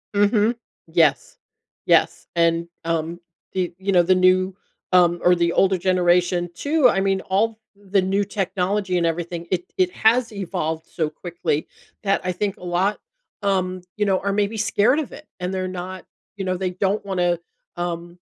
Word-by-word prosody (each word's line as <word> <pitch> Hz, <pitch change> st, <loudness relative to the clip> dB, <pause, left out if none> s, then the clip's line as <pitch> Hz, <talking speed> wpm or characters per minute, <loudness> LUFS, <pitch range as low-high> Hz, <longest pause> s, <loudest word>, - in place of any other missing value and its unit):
Mhm, 205 Hz, +3 st, +3 dB, 0.3 s
yes, 160 Hz, -6 st, +2 dB, 0.5 s
yes, -, -, +2 dB
and, 170 Hz, 0 st, +2 dB, 0.2 s
um, 165 Hz, +1 st, -2 dB, 0.4 s
y 185 Hz, -2 st, 0 dB
you 190 Hz, +1 st, -2 dB
know, 180 Hz, -2 st, +5 dB
the 185 Hz, +2 st, +4 dB
new, 185 Hz, +1 st, +3 dB, 0.4 s
um, 175 Hz, -1 st, +5 dB
or 180 Hz, 0 st, +6 dB
the 170 Hz, -1 st, +1 dB
older 190 Hz, -1 st, +3 dB
generation 175 Hz, -1 st, +2 dB
too, 285 Hz, -, +3 dB
I 195 Hz, -, +1 dB
mean, 195 Hz, -1 st, +1 dB
all 215 Hz, +4 st, 0 dB, 0.2 s
the 200 Hz, -1 st, 0 dB
new 195 Hz, +2 st, +1 dB
technology 195 Hz, -1 st, -1 dB
and 170 Hz, -, +1 dB
everything, 170 Hz, +1 st, -3 dB
it 180 Hz, -2 st, -2 dB
it 185 Hz, -1 st, +2 dB
has 230 Hz, +4 st, +2 dB
evolved 170 Hz, -5 st, -3 dB
so 160 Hz, -3 st, -2 dB
quickly 160 Hz, -1 st, -3 dB, 0.4 s
that 195 Hz, -1 st, +1 dB
I 185 Hz, -, 0 dB
think 195 Hz, +2 st, -2 dB
a -, -, -14 dB
lot, 180 Hz, +4 st, 0 dB, 0.4 s
um, 185 Hz, -2 st, 0 dB, 0.2 s
you 210 Hz, -, +1 dB
know, 190 Hz, -2 st, +2 dB
are 200 Hz, 0 st, -1 dB
maybe 205 Hz, +2 st, 0 dB
scared 220 Hz, +6 st, +3 dB
of 305 Hz, -, -4 dB
it 305 Hz, -, -12 dB
and 180 Hz, +1 st, -3 dB
they're 185 Hz, 0 st, -2 dB
not, 185 Hz, 0 st, -6 dB, 0.3 s
you 195 Hz, -, -3 dB
know, 185 Hz, -1 st, -1 dB
they 185 Hz, 0 st, -2 dB
don't 195 Hz, +3 st, -1 dB
wanna, 175 Hz, -3 st, 0 dB, 0.4 s
um, 175 Hz, 0 st, -4 dB
185 Hz, 170 wpm, -22 LUFS, 175-200 Hz, 0.5 s, or